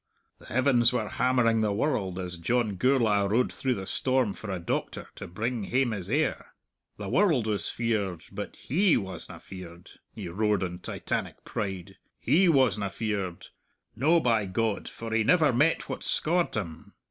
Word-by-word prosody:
The - - -15
heavens 125 -1 +3
were 120 -4 -1
hammering 120 -3 +2
the 105 -1 +1
world 100 -5 -1
as 90 -1 -4
John 110 +3 0
Gourla' 110 -3 +2
rode 115 +5 +2
through 130 -2 0
the 95 - -5
storm 130 -1 +1
for 110 - -8
a 95 - -2
doctor 85 - -3
to - - -8
bring 110 +4 -3
hame 130 +1 +1
his 95 -3 -4
heir. 150 +6 -1 0.4
The 105 - -6
world 160 - +3
was 105 -2 -1
feared, 100 -8 -1
but 100 +1 -6
he 180 +6 +2
wasna 95 -4 -5
feared," 90 -2 -11 0.2
he - - -6
roared 105 +3 +1
in 90 -1 -4
Titanic - - -4
pride, 95 -3 -4 0.2
"he 180 +3 +3
wasna 125 -9 +3
feared; 100 -4 -3 0.5
no, 155 +9 +4
by 115 -8 +2
God, 110 +2 -1
for 115 -1 -6
he 110 0 +3
never 155 0 +4
met 150 +7 +2
what - - -5
scaured 175 +2 0
him!... 85 -7 -6
110 Hz, 165 wpm, -28 LUFS, 95-130 Hz, 0.5 s, no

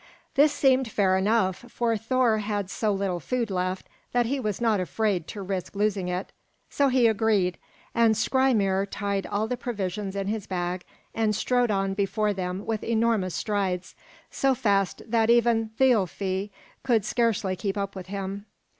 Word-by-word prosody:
This 295 +1 +5
seemed 265 -4 +3
fair 195 -3 +2
enough, 190 -1 +2
for 235 -1 0
Thor 230 0 +2
had 205 -2 -3
so 210 +2 0
little 195 -3 -1
food 235 - -2
left 185 0 -2 0.3
that 245 -1 +3
he 270 +4 -1
was 210 -5 -2
not 225 -4 +2
afraid 185 -2 -1
to 205 -3 -6
risk 190 0 -4
losing 200 -2 0
it; 180 +2 -3 0.4
so 280 - +2
he 255 -2 +3
agreed, 210 -5 +2 0.3
and 230 -1 +4
Skrymir 220 -6 +2
tied 200 -1 -2
all 205 +1 -1
the 250 - -1
provisions 200 -4 -3
in 195 -1 -2
his 210 0 -3
bag 180 -1 -3 0.3
and 220 -2 +1
strode 245 +2 +1
on 195 -1 0
before 205 +1 0
them 185 0 -4
with 220 -2 -2
enormous 220 -6 +1
strides, 185 -2 -2 0.4
so 270 -1 +2
fast 200 -6 +1
that 225 0 +1
even 235 -1 +3
Thialfi 200 -5 +1 0.3
could 230 -6 +2
scarcely 215 -5 +1
keep 195 +2 -3
up 200 0 -3
with 185 -2 -7
him. 200 +1 -5
205 Hz, 165 wpm, -26 LUFS, 190-230 Hz, 0.4 s, This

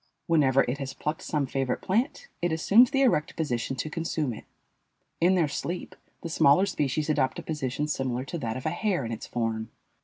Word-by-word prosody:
Whenever 135 -5 +4
it 125 +3 -3
has 135 -1 -5
plucked 150 +1 -3
some 150 -3 -1
favorite 135 0 -1
plant, 245 - 0
it 175 -1 +1
assumes 200 +10 +5
the 275 0 +2
erect 170 - +2
position 135 -5 -2
to 130 - -3
consume 155 -4 -2
it. - - -10 0.7
In 180 +3 +4
their 170 -4 +3
sleep 170 +5 -4 0.3
the - - -3
smaller 155 +3 +5
species 150 -5 -1
adopt 140 -4 +1
a - - -6
position 150 -1 -2
similar 130 -3 -2
to 170 - -5
that 115 -3 -3
of 130 - -8
a 155 - +1
hare 175 - 0
in 115 - -4
its 115 - -6
form. 115 -2 -2
150 Hz, 195 wpm, -27 LUFS, 130-170 Hz, 0.7 s, assumes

